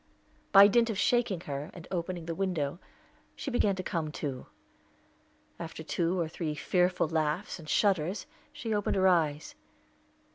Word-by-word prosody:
By 200 0 +10
dint 230 +3 +3
of 215 - -2
shaking 220 -6 +1
her, 145 0 -5
and 175 -2 -10
opening 175 -1 -3
the 165 - -3
window, 170 -4 -2 0.6
she 275 - -5
began 210 -5 +2
to 185 - -4
come 160 -4 -2
to. 135 -4 -5 1.1
After 160 -1 -7
two 170 +3 0
or 165 - 0
three 155 -1 -4
fearful 180 +3 +1
laughs 160 +4 -1
and 155 -2 -11
shudders, 190 -2 +1 0.3
she 225 -3 -4
opened 205 -1 0
her 190 -1 +4
eyes. 160 -4 +1
175 Hz, 150 wpm, -30 LUFS, 155-195 Hz, 1.1 s, By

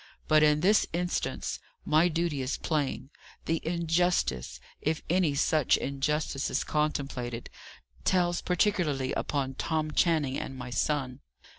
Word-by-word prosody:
But 155 -1 +5
in 150 0 +4
this 205 +5 +4
instance, 175 +1 -2 0.3
my 155 +3 +4
duty 165 -4 -1
is 130 +1 -2
plain. 145 -3 -2 0.3
The 165 0 0
injustice 170 - 0 0.2
if 155 +1 -1
any 175 -5 +2
such 150 0 +3
injustice 140 0 -1
is - - 0
contemplated 135 -6 -2 0.5
tells 175 -1 +2
particularly 170 -8 +1
upon 135 -2 -1
Tom 155 +2 -1
Channing 150 -5 +2
and 135 - -6
my 125 -1 -7
son. 130 +1 -1
150 Hz, 125 wpm, -29 LUFS, 135-170 Hz, 0.5 s, But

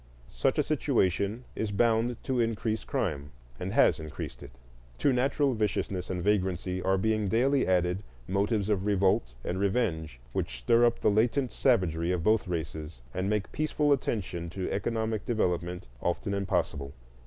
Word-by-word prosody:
Such - - +1
a - - +4
situation 100 +6 +1
is 110 - -2
bound 115 +2 +2
to 130 -2 -1
increase 110 -1 0
crime, 75 - -2 0.3
and - - -3
has - - +4
increased 80 -1 -7
it. - - -9 0.5
To 140 - +3
natural 135 +2 +2
viciousness 100 -4 -1
and 90 -2 -2
vagrancy 95 -2 0
are 95 +1 +2
being 110 +1 +1
daily 130 +6 +2
added 90 0 +2 0.3
motives 100 +1 +1
of 100 -2 0
revolt 95 - +2
and 90 - -2
revenge 90 - 0
which - - -2
stir 115 - +4
up 120 - +1
all - - +6
the - - 0
latent 125 +4 +2
savagery 90 -9 +2
of 90 -3 -1
both 110 +1 +3
races 80 -5 -5
and 95 +2 -1
make 105 -2 -1
peaceful 150 -1 +2
attention 90 -10 -2
to 95 +2 -4
economic 110 +1 -1
development 90 -7 -1 0.2
often 100 +4 -1
impossible. 75 -8 -1
100 Hz, 155 wpm, -29 LUFS, 90-115 Hz, 0.5 s, all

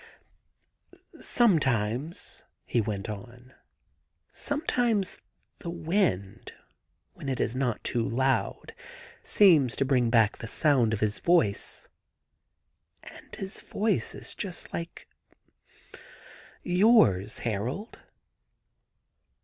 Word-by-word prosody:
* - - -27 0.4
Sometimes,' 140 - +1 0.2
he 120 - +1
went 105 -2 -4
on, 120 +4 -9 0.8
'sometimes 245 - -1 0.4
the 170 - -6
wind, 170 - -1 0.6
when 140 - -7
it 130 - -2
is 120 - -1
not 130 -4 -1
too 115 -2 -1
loud, 130 +2 -1 0.5
seems 155 - +5
to 135 - 0
bring 125 -3 +2
back 110 -3 +3
the 115 - -6
sound 130 -3 +2
of 110 - -2
his 105 -1 0
voice... 170 - +1 1.2
and - - -12
his 195 0 -6
voice 210 -1 -1
is - - -9
just 185 -4 -6
like 170 0 -6 1.6
yours, 175 - +4
Harold. 120 - -4
130 Hz, 95 wpm, -28 LUFS, 115-180 Hz, 1.6 s, seems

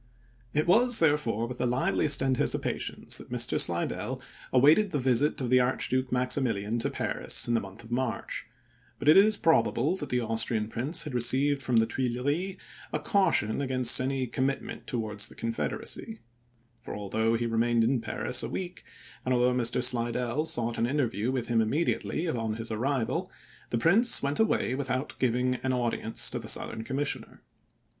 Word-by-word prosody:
It 150 +1 0
was, 230 +7 +5
therefore, 145 -8 +1
with 125 +1 -7
the 125 - +1
liveliest 135 +3 +2
anticipations 130 -1 -1
that - - -13
Mr. - - +1
Slidell - - -1 0.3
awaited 150 +11 +5
the 150 - -2
visit 130 +2 +1
of 125 -2 -3
the 130 - +6
Archduke 130 +1 0
Maximilian 120 -4 0
to - - -1
Paris - - +1
in 120 - 0
the 115 - +3
month 95 +3 -11
of 115 - -14
March; 120 -4 -3 0.5
but 140 - -6
it 155 - +8
is 210 +2 +6
probable 145 0 +2
that - - -6
the 125 - +1
Austrian 115 -1 -1
prince 130 +9 0
had 150 - -6
received 135 +4 +2
from 125 -2 -1
the 115 0 +5
Tuileries 130 +11 -2 0.3
a - - 0
caution 165 - +1
against 130 -2 +3
any 130 0 -1
commit 130 +3 -1
ment - - -9
towards 105 -4 -2
the - - -14
Confederacy; 115 - -3 0.6
for, - - -8
although 110 +3 -1
he 120 +1 -1
remained 115 0 +1
in 120 +1 +1
Paris 120 +2 0
a - - -4
week, 180 -1 -6 0.4
and 130 0 +1
although 125 +1 +2
Mr. 125 0 +1
Slidell 120 +3 +1
sought 120 -6 +1
an 115 - +1
interview 125 -4 -1
with 125 -3 -2
him 115 -2 +2
immediately 160 +7 -1
on 115 -7 -2
his 115 0 -6
arrival, 125 +2 -1 0.4
the 120 - -1
prince 200 - +3
went 140 +1 -1
away 220 - +1
without 130 0 -2
giving 125 0 +1
an 130 - -1
audience 120 -2 0
to - - -2
the - - -7
Southern 110 0 -2
commissioner. 130 -1 -4
125 Hz, 170 wpm, -28 LUFS, 115-140 Hz, 0.6 s, it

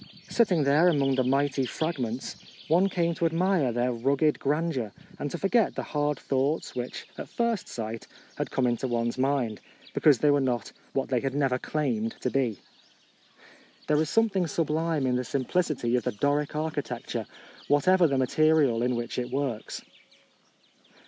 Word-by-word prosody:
Sitting 185 -10 +3
there 145 +5 +4
among 140 -5 +3
the 130 -1 +2
mighty 135 +1 +1
fragments, 130 -3 -3 0.3
one 180 +5 +4
came 170 -2 0
to 165 0 +1
admire 165 -4 +1
their 120 +2 0
rugged 140 +6 +1
grand 155 +3 0
eur 115 -5 -3 0.3
and 145 - -2
to 175 - -4
forget 210 +5 +2
the - - -3
hard 150 0 -1
thoughts 140 +3 -1
which, 125 0 -5
at - - -6
first 235 -4 -1
sight, 115 -1 -6 0.3
had - - -3
come 130 - 0
into 120 +2 0
one's 120 0 -1
mind, 130 -5 0 0.3
because 145 -4 +5
they 145 +3 +3
were 145 0 +3
not 125 -4 -1 0.2
what 135 - -1
they 125 -2 +2
had 135 +2 -3
never 135 -3 +1
claimed 120 -8 -1
to 125 - -1
be. 125 -7 0 1.3
There 150 0 +2
is 155 - -1
something 200 -6 +2
sublime 160 -1 0
in 125 -1 +1
the 125 - -1
simplicity 135 -1 0
of 125 - 0
the - - -2
Doric 145 +6 0
architecture, 140 -7 -3 0.4
whatever 175 +4 +4
the 140 -2 0
material 140 -2 +3
in 125 0 +1
which 120 +1 -3
it 125 0 -3
works. 130 -4 -3
140 Hz, 165 wpm, -27 LUFS, 125-160 Hz, 1.3 s, because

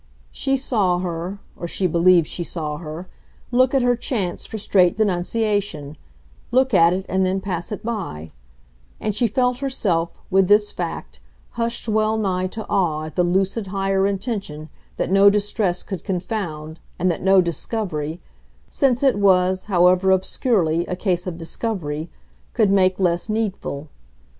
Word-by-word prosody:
She 270 0 0
saw 210 -9 +1
her 180 +1 -4 0.2
or 170 - -6
she 185 - -2
believed 175 0 +4
she 175 - -4
saw 155 -3 -4
her 160 +3 -7 0.4
look 255 +2 +3
at 265 - +3
her 245 0 +3
chance 215 -7 -3
for 220 - -6
straight 190 -3 +3
denunciation, 200 -5 -1 0.5
look 260 0 +2
at 170 -2 +6
it 190 +1 -2
and 190 +1 +1
then 185 +1 0
pass 180 -2 -4
it 210 0 -5
by; 175 - -4 0.7
and 215 - -2
she 235 +4 +1
felt 250 +2 0
herself, 190 -12 -1
with 190 0 +4
this 210 +1 +4
fact, 165 - -6 0.3
hushed 235 0 -2
well 215 0 +1
nigh 185 -3 0
to 220 +3 -6
awe 155 -5 0
at 155 - -9
the 180 - +3
lucid 195 +4 0
higher 195 0 +1
intention 195 -7 -4 0.3
that - - -2
no 195 +1 +7
distress 200 -3 0
could 190 -4 -6
confound 175 -5 -4 0.2
and 180 0 +2
that 165 - -4
no 190 +1 +5
discovery 170 -2 -2 0.5
since 260 -2 +1
it 260 -7 +3
was, 185 -1 +3
however 180 -1 +3
obscurely, 185 - +1
a 180 - -2
case 180 -1 -1
of 170 -2 -4
"discovery" 165 -3 -4 0.4
could 215 -5 +3
make 185 -1 +3
less 175 +1 +1
needful. 200 -9 -3
190 Hz, 155 wpm, -22 LUFS, 175-215 Hz, 0.7 s, no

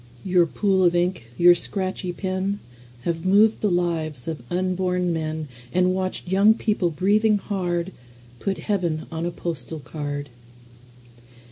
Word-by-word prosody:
Your 180 -2 +3
pool 190 +2 +2
of 175 -1 +4
ink, 175 -8 0
your 175 0 +8
scratchy 185 0 -3
pen, 190 +2 -2 0.4
Have 165 +3 -2
moved 205 +4 +4
the 210 - +2
lives 165 -7 -1
of 160 -5 -4
unborn 180 -1 0
men, 155 -1 -3 0.2
And 180 +1 +3
watched 185 -1 -3
young 200 +4 +5
people, 210 -6 0
breathing 205 +6 +3
hard, 180 -3 -2 0.5
Put 195 +6 -1
Heaven 175 -7 -1
on 165 +1 -2
a - - -2
postal 160 -3 -5
card. 145 -1 -5
180 Hz, 135 wpm, -24 LUFS, 165-190 Hz, 0.5 s, your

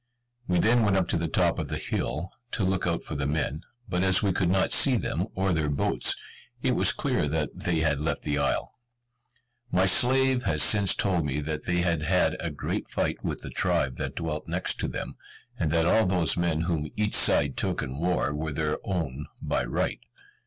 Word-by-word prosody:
We 90 - +1
then 115 +6 +4
went 100 -3 +2
up 95 - +1
to - - 0
the 85 0 -1
top - - +1
of - - -3
the - - -3
hill, 90 +5 -3 0.2
to 105 - 0
look 95 -1 0
out 85 -1 -1
for - - -6
the 70 0 -2
men; 75 +1 -2 0.3
but 90 -3 -1
as 95 +1 +4
we 100 - +2
could 90 -1 +1
not 95 +1 +2
see 135 -3 +5
them, 90 -1 -2
or 95 -1 +1
their 80 -2 0
boats, 70 - 0 0.5
it - - +2
was - - +3
clear 75 - -1
that 75 +1 -1
they 90 -3 -1
had 70 -3 +1
left 80 - -2
the 75 -1 -1
isle. 70 - -1 0.9
My 90 +1 +3
slave 130 +6 +4
has 75 -2 +3
since 100 -3 +4
told 90 -4 +1
me 75 0 -2
that 75 +1 -4
they 90 -1 +1
had 85 -3 0
had 90 +4 +2
a - - -3
great - - -4
fight - - -2
with - - -3
the - - -7
tribe 65 -2 0
that - - -4
dwelt 75 -2 -4
next - - -1
to - - -1
them; - - -6 0.4
and 80 - 0
that 80 +1 +2
all 110 +4 +3
those 90 -5 +2
men 85 -2 0
whom 80 -3 -2
each 105 0 0
side 70 -2 +4
took - - -1
in 65 +3 -6
war 85 -3 0
were 75 +1 -3
their 75 0 -1
own 75 -7 -3
by 65 - -1
right. - - -2
85 Hz, 210 wpm, -27 LUFS, 75-95 Hz, 0.9 s, see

